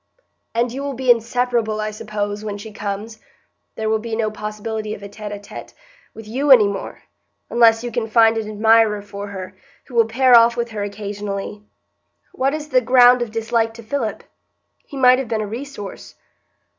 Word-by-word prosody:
"And 235 +1 +1
you 270 - -5
will 280 -1 -4
be 255 0 +3
inseparable 235 -1 0
I 215 0 -2
suppose, 210 -1 -4
when 205 -1 -4
she 215 +2 -9
comes. 210 +2 -5 0.6
There 220 - -3
will 220 0 +1
be 225 0 -4
no 220 -1 -1
possibility 215 0 -5
of 200 - -13
a - - -6
tête 210 +1 -8
à 205 - -6
tête 205 - -11 0.4
with 225 -1 -10
you 270 +6 -2
any 235 -6 +8
more, 200 -1 -6 0.5
unless 230 -1 +4
you 240 - -4
can 225 0 -2
find 225 0 +4
an 220 -1 -3
admirer 215 -1 +3
for 200 0 -7
her, 190 -1 -8 0.3
who 255 - -16
will 230 -2 +4
pair 250 +2 +4
off 235 +1 +6
with 235 -1 -2
her 210 -2 -4
occasionally. 205 0 -5 0.7
What 270 +3 0
is 305 -1 -7
the 255 -3 +3
ground 250 0 +6
of 240 - -2
dislike 225 0 -1
to 230 - -11
Philip? 225 -1 -3 0.6
He 280 - -9
might 255 -1 +5
have 265 - -4
been 220 -1 -1
a - - -2
resource." 230 -1 -8
225 Hz, 190 wpm, -20 LUFS, 210-240 Hz, 0.7 s, any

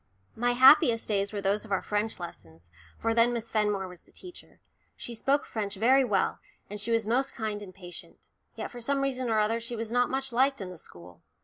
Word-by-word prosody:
My 245 +1 +1
happiest 245 -2 +6
days 200 -1 0
were 205 -2 -4
those 200 +2 +1
of 220 - -12
our 195 - +1
French 210 0 -1
lessons, 85 - -11 0.3
for 225 - 0
then 230 +1 +4
Miss 230 -1 -4
Fenmore 210 -3 0
was 180 -2 -12
the - - -26
teacher. 360 -2 -12 0.4
She 240 - -7
spoke 275 +5 +1
French 210 -2 -4
very 255 +7 +4
well, 210 -6 0 0.3
and 210 0 -4
she 220 - -5
was 230 -2 +2
most 255 +5 0
kind 215 -2 -3
and 195 -3 -9
patient. 180 -1 -10 0.3
Yet - - -5
for 245 - -8
some 275 +4 0
reason 260 -2 -1
or 220 - +2
other 215 +2 +2
she 235 +1 -6
was 225 0 -5
not 245 0 +2
much 265 -1 -2
liked 270 +3 +2
in 185 -2 -6
the 180 - -10
school. 85 - -11
225 Hz, 220 wpm, -28 LUFS, 200-245 Hz, 0.4 s, happiest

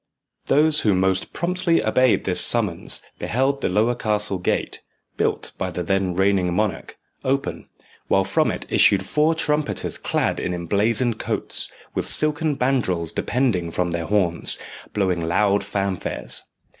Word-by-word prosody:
Those 150 +1 +3
who 105 -3 +2
most 95 0 0
promptly 175 0 0
obeyed 125 +2 +3
this 90 -2 +5
summons 105 -8 +4 0.2
beheld 135 +3 0
the - - 0
lower 110 +6 +2
castle 105 -4 +1
gate, 90 - -2 0.3
built - - -1
by 95 - -2
the 90 0 -4
then 95 0 0
reigning 95 -2 +1
monarch, 105 0 -2 0.3
open, 135 +1 -2 0.4
while 95 - +3
from 95 - +1
it - - -4
issued 95 -1 +4
four 155 +6 +1
trumpeters 150 -2 -1
clad - - -1
in 90 - -2
emblazoned 105 +7 0
coats, - - -2 0.2
with - - -2
silken 155 0 +2
bandrols 120 -11 -1
depending 115 -10 0
from 90 +1 -2
their 85 0 -3
horns, 90 -4 0 0.3
blowing 95 -4 0
loud 100 +4 +1
fanfares. 100 -2 -3
105 Hz, 140 wpm, -22 LUFS, 90-130 Hz, 0.4 s, this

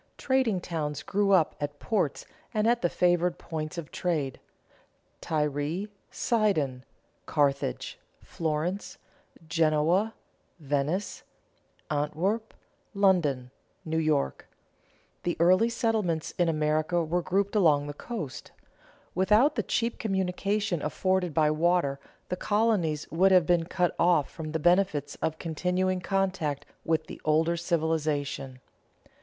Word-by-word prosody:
Trading 260 -7 +1
towns 150 -4 -4
grew 200 0 +1
up 185 -5 +4
at 145 0 -3
ports 185 -5 -1 0.3
and 215 0 +2
at 235 +1 +3
the 175 - +2
favored 175 0 +2
points 155 0 -5
of 165 -3 -6
trade: 150 -7 -2 0.8
Tyre, 150 +4 -1 0.2
Sidon, 160 - 0 0.4
Carthage, 140 - 0 0.2
Florence, 165 +4 -3 0.5
Genoa, 165 +6 +2 0.4
Venice, 145 +6 -1 0.7
Antwerp, 170 +10 -1 0.4
London, 160 -11 +2 0.3
New 160 0 0
York. 150 - 0 0.7
The 175 - -2
early 185 +7 +5
settlements 215 -9 -1
in 175 -1 +3
America 155 +2 +1
were 170 +3 0
grouped 195 +4 0
along 155 -8 +4
the 145 - -5
coast. 155 - -6 0.6
Without 210 - +4
the - - 0
cheap 230 0 -1
communication 195 -2 -1
afforded 185 +2 0
by 150 0 +3
water, 155 -3 +1 0.3
the 180 - -1
colonies 200 -7 +1
would 190 +4 +4
have 180 -3 +6
been 170 0 +2
cut 175 0 0
off 170 -4 +3
from 155 -2 -6
the 160 - 0
benefits 160 -4 +2
of 160 0 -1
continuing 180 +3 -1
contact 190 -7 -1 0.2
with 160 -1 0
the - - -10
older 160 +2 +2
civilization. 155 -6 -1
170 Hz, 115 wpm, -28 LUFS, 150-190 Hz, 0.8 s, have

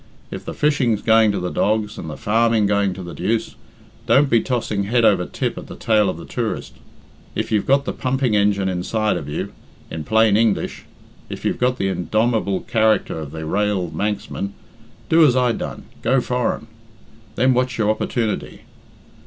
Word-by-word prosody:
If - - -7
the - - -6
fishing's 130 -8 +1
going 110 -1 +5
to 100 - -2
the 90 0 -3
dogs 105 0 0
and 80 - -6
the 75 - -7
farming 115 0 +2
going 100 -1 +1
to 95 - -7
the 85 - -8
deuce, 110 +5 -1 0.5
don't 140 0 +4
be 115 - +5
tossing 110 -6 -1
head 120 +2 +2
over - - +3
tip - - -3
at - - -10
the - - -9
tail 105 -3 +2
of 90 - -4
the 85 - -9
tourist. 115 -3 -4 0.6
If - - -2
you've 105 -2 +1
got 140 +1 +3
the - - -2
pumping 130 -3 0
engine 100 -1 +2
inside 100 +4 0
of 70 - -5
you, 75 - -4 0.4
in 80 -1 -4
plain 110 +3 +3
English, 110 -1 0 0.4
if - - -7
you've - - 0
got 125 0 +1
the 95 - 0
indomable 100 +3 0
character 110 -7 +2
of 75 -3 -6
the 80 +1 -6
rael 100 -1 0
Manxman, 100 +2 -3 0.5
do 165 0 +5
as 135 -5 +5
I 125 -1 +3
done - - -5 0.2
go 130 +4 +3
foreign. 125 -2 -1 0.7
Then 130 +2 +3
watch 125 -1 0
your 105 -1 +2
opportunity. 110 0 -2
110 Hz, 180 wpm, -21 LUFS, 100-120 Hz, 0.7 s, going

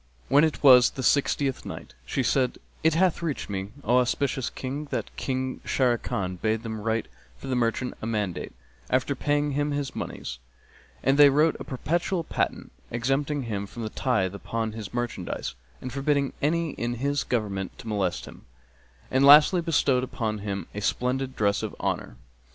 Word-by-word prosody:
When 145 +3 +6
it 160 -1 0
was 125 -3 +8
the 130 - -6
Sixtieth 140 0 +2
Night, - - -8
She 130 - 0
said, 125 0 +1 0.3
It 160 0 +4
hath 180 0 +2
reached 155 -10 -3
me, 95 0 -3
O 125 +2 +4
auspicious 125 0 0
King, 140 +3 -5
that - - -4
King 130 -1 -3
Sharrkan 105 -8 0
bade 110 0 0
them 110 -2 -5
write 110 +1 -1 0.3
for - - -11
the 130 -1 -1
merchant 125 +1 0
a 110 - -3
mandate, 105 -5 -2 0.4
after 130 +2 +1
paying 145 +2 0
him 145 +1 0
his 145 -2 -3
monies; - - -5 0.6
and 135 +3 +3
they 145 -1 +10
wrote 150 +3 +3
a - - -5
perpetual 170 +6 -1
patent, - - -2 0.2
exempting 135 +4 0
him 100 -4 -3
from 115 +3 -7
the 110 - -3
tithe 110 -7 0
upon 110 +2 -3
his 110 -2 -7
merchandise 120 - -3 0.3
and 130 -1 -6
forbidding 140 0 +1
any 165 +2 +1
in 120 -1 -3
his 140 +3 0
government 100 -6 -2
to - - -10
molest 100 -5 -1
him; - - -14 0.6
and 130 +1 +3
lastly 150 +6 +8
bestowed 145 -6 +2
upon 110 -4 -3
him 100 -3 -4
a 105 - -4
splendid 130 +4 -1
dress 100 -1 +1
of - - -4
honour. - - -2
130 Hz, 170 wpm, -26 LUFS, 110-145 Hz, 0.6 s, they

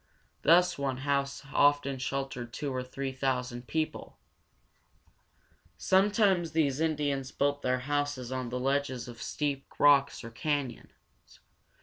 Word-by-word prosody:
Thus 180 0 +4
one 135 -2 -1
house 140 0 0
often 145 -2 +3
sheltered 130 -2 -4
two 145 +1 -4
or 130 - -2
three 135 +1 -4
thousand 125 -2 -2
people. 160 -1 -3 1.6
[Illustration: - - -42 0.3
Cliff 205 0 -3
Dwellings.] - - -2
Sometimes 190 -6 +3
these 145 -4 +1
Indians 145 -4 -1
built 145 0 0
their 125 0 +1
houses 145 -2 -2
on 130 -2 -3
the 125 +1 -3
ledges 135 -1 -1
of 120 -1 -10
steep 140 -2 -2
rocks, 140 -2 +4
or 115 - -8
canyons. 140 -1 -5
140 Hz, 135 wpm, -30 LUFS, 130-145 Hz, 1.6 s, Thus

